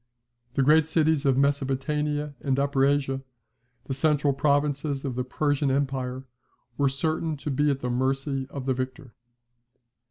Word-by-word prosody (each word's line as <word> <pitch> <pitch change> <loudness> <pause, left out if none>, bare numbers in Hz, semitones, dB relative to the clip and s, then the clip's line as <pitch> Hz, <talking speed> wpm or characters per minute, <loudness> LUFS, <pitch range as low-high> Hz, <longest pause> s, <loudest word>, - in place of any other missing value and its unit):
The 135 - +3
great 155 +2 +5
cities 160 -2 +2
of 130 -1 +3
Mesopotamia 145 +2 0
and 135 -2 0
Upper 140 -1 +1
Asia, 135 -1 0 0.6
the 135 - -3
central 145 0 +2
provinces 145 0 0
of 135 - -2
the 125 +1 -2
Persian 145 +2 0
empire, 130 -1 -1 0.5
were 140 +1 +2
certain 155 +3 -1
to 140 +1 -4
be 145 +2 +2
at 140 -1 -1
the 125 - -2
mercy 135 +1 -1
of 140 -2 -6
the 135 - +1
victor. 130 0 -5
140 Hz, 150 wpm, -26 LUFS, 135-150 Hz, 0.6 s, great